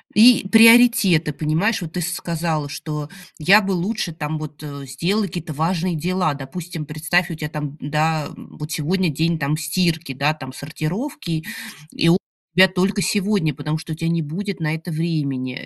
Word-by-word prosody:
И 225 -2 +6
приоритеты, 225 - +6
понимаешь. 160 +9 0
Вот 165 -1 -7
ты 180 - -2
сказала, 165 -3 -2
что 150 0 -5 0.3
я 195 +7 +6
бы 195 0 -2
лучше 185 0 -2
там 155 0 -4
вот 155 0 -8 0.2
сделала 175 +11 0
какие-то 175 -3 -5
важные 170 +3 0
дела. 180 0 0
Допустим, 155 +3 -7
представь, 165 +4 0
у 165 - -4
тебя 150 -1 -5
там, 150 -1 -5
да, 155 +1 0
вот 150 +1 -9
сегодня 175 +4 0
день 160 +3 0
там 145 0 0
стирки, 160 -1 -1
да, 145 +4 +1
там 130 -4 -9
сортировки, 165 - -4 0.5
и 165 - +2
у 175 - +6 0.4
тебя 190 +1 +8
только 190 +2 0
сегодня, 200 -6 +1
потому 150 +3 -3
что 160 0 -6
у - - -5
тебя 165 +1 -2
не 165 -1 0
будет 190 +5 -4
на 155 -1 -1
это 160 +2 -6
времени, 145 -6 -2
165 Hz, 170 wpm, -21 LUFS, 150-185 Hz, 0.5 s, тебя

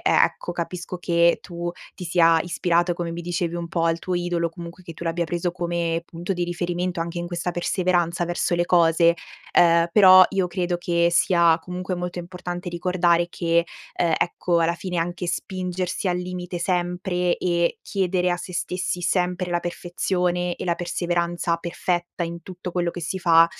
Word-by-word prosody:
ecco, 175 - +2
capisco 175 +1 -5
che 170 -1 +2
tu 175 0 -5 0.2
ti 180 - -8
sia 165 -1 +4
ispirato, 175 0 +1
come 170 -1 -3
mi 170 +1 -5
dicevi 175 0 -2
un 170 -1 -4
po', 165 -1 -1
al 165 0 +1
tuo 180 +1 -3
idolo, 175 -1 0
comunque 170 +1 -10
che 165 - -8
tu 170 - -10
l'abbia 170 +1 0
preso 175 +1 -1
come 170 -1 -2
punto 175 +3 -4
di 175 -1 -1
riferimento 175 0 -2
anche 170 +1 -3
in 175 - -3
questa 175 0 -3
perseveranza 175 -1 0
verso 175 0 0
le 175 0 +2
cose. 170 -1 +4 0.4
Ehm, 170 0 +5
però 185 -3 +9
io 190 -2 +1
credo 175 -1 -1
che 170 -1 +2
sia 170 -1 +4
comunque 180 +2 -4
molto 180 0 -4
importante 175 0 -6
ricordare 175 -1 +2
che, 170 -1 +1 0.3
ehm, 165 -2 +2
ecco, 175 0 +1
alla 165 +1 +2
fine, 180 0 -5
anche 175 +1 -2
spingersi 185 +1 -3
al 175 - +1
limite 180 -1 -5
sempre 180 0 0
e 170 -1 0
chiedere 180 -2 0
a 175 - +1
sè 180 - -8
stessi 180 +1 -2
sempre 180 0 0
la 175 0 +1
perfezione 175 0 -1
e - - -5
la 170 -1 +1
perseveranza 175 -1 -1
perfetta 175 0 -3
in 170 0 -5
tutto 180 -1 -7
quello 175 -1 0
che 175 - -7
si 190 +4 -3
fa, 165 -1 +6
175 Hz, 175 wpm, -23 LUFS, 170-180 Hz, 0.4 s, però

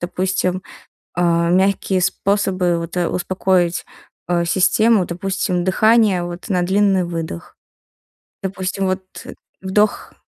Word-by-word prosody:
допустим, 185 +1 -1 0.5
а, 170 -1 +1
мягкие 190 +1 +2
способы, 185 -2 0
вот, 170 +2 -6
э, 175 - +1
успокоить, 180 -1 0 0.4
э, 175 -1 +1
систему. 190 +3 +3
Допустим, 180 0 -2
дыхание, 205 -1 +3
вот, 175 +4 -7
на 180 -2 +1
длинный 195 0 +2
выдох. 170 0 -6 0.9
Допустим, 190 0 -3
вот, 185 0 -1 0.6
вдох 205 +2 0
185 Hz, 105 wpm, -19 LUFS, 175-195 Hz, 0.9 s, систему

